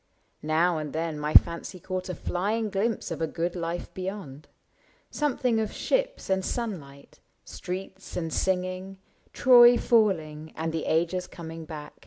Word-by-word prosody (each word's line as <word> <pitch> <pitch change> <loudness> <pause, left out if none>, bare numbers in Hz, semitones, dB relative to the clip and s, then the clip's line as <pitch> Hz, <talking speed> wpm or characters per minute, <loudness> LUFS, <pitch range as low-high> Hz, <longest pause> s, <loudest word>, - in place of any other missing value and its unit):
Now 160 +2 +2
and 150 -2 -5
then 160 -1 -2
my 150 +1 -2
fancy 170 +2 +4
caught 185 +1 -4
A 180 - -3
flying 210 +4 -1
glimpse 205 -1 -1
of 165 - -4
a 160 - +1
good 170 +3 -2
life 170 0 -4
beyond 185 -7 -6 0.3
— - - -34 0.3
Something 255 -5 +1
of 215 -1 -1
ships - - -1
and 190 0 +1
sunlight, 160 - -5 0.3
streets 190 +1 -7
and 165 -2 -3
sing 185 -1 +1
ing, 185 +1 -6 0.3
Troy 245 -1 +7
falling, 160 -11 +1
and 160 +1 -2
the 160 - -2
ages 175 +3 0
coming 165 -1 -8
back. 155 -2 -8
180 Hz, 155 wpm, -27 LUFS, 160-200 Hz, 0.3 s, Troy